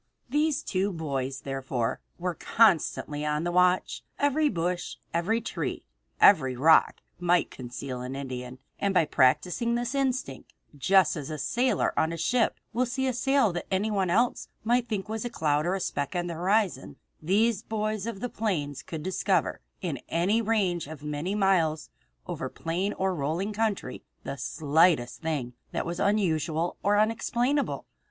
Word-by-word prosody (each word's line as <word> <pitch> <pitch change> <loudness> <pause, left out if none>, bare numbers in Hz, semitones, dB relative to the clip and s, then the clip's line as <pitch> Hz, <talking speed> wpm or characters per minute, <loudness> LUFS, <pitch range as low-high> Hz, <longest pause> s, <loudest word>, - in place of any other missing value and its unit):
These 295 +2 +1
two 195 +1 0
boys, 135 -5 -3
therefore, 130 -3 -2 0.2
were 180 0 -2
constantly 160 -6 +2
on 150 +1 0
the 175 - -1
watch. 180 +1 +2 0.2
Every 290 +1 +2
bush, 175 -2 -2 0.2
every 180 +8 +1
tree, 230 - -4 0.4
every 135 -10 +6
rock, 155 +6 +4 0.2
might 175 -1 +2
conceal 125 0 -6
an 125 +2 -5
Indian, 125 -2 -6 0.2
and 200 -1 0
by 165 - +5
practicing 165 - +2
this 240 +1 -2
instinct, 260 - -2 0.2
just 180 +5 +4
as 145 -4 -5
a 155 - -4
sailor 250 - +1
on 160 - +1
a 170 - -4
ship 245 +6 +1
will 250 +2 +1
see 265 +2 -1
a 260 - +1
sail 255 -4 +2
that 175 - -4
anyone 195 -1 0
else 235 +7 +1 0.2
might 240 +2 +2
think 210 -2 -2
was 220 0 -3
a 240 - -3
cloud 155 -7 0
or 185 - +1
a - - -2
speck 145 -2 -3
on 175 0 0
the 175 - -4
horizon, 180 -5 0 0.3
these 205 +6 +2
boys 215 -1 -2
of 215 -4 -5
the 245 - -1
plains 160 - -2
could 160 -2 -7
discover, 190 +1 0 0.2
in 155 -8 -2
a 190 +7 +2
range 195 -8 0
of 150 -1 -9
many 150 +6 -2
miles 180 -6 +1 0.3
over - - -4
plain 180 +5 -2
or 190 0 0
rolling 170 +7 -2
country, 205 - -2 0.2
the - - -4
slightest 150 -2 +2
thing 145 -7 -2 0.2
that - - -2
was 170 +1 -4
unusual 170 -5 +1
or 205 +1 +3
unexplainable. 240 +6 0
180 Hz, 160 wpm, -27 LUFS, 150-215 Hz, 0.4 s, every